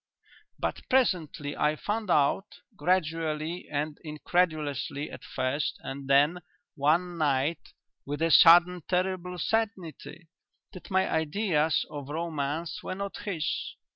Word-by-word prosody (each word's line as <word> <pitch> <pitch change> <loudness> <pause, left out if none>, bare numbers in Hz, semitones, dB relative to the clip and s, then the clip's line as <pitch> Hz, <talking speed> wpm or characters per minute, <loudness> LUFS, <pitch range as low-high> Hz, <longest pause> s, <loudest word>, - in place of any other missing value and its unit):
But - - -3
presently 165 - +1
I 150 +1 +1
found 210 +5 -3
out 150 +6 +1
gradually 165 -3 -1
and 150 +1 -3
incredulously 150 -3 -1
at - - -10
first 130 +3 -2
and 135 0 -6
then 145 +6 +4 0.3
one 170 +5 +1
night 145 +1 0 0.3
with 145 +3 -3
a 165 - +2
sudden 175 +2 +7
terrible 180 -1 -1
certainty 175 -5 -3 0.5
that 185 - -11
my 190 -1 +2
ideas 160 -2 +1
of 145 -2 -7
romance 160 0 -3
were - - -5
not 200 +1 -5
his.... 170 -7 -3
160 Hz, 115 wpm, -28 LUFS, 150-180 Hz, 0.5 s, sudden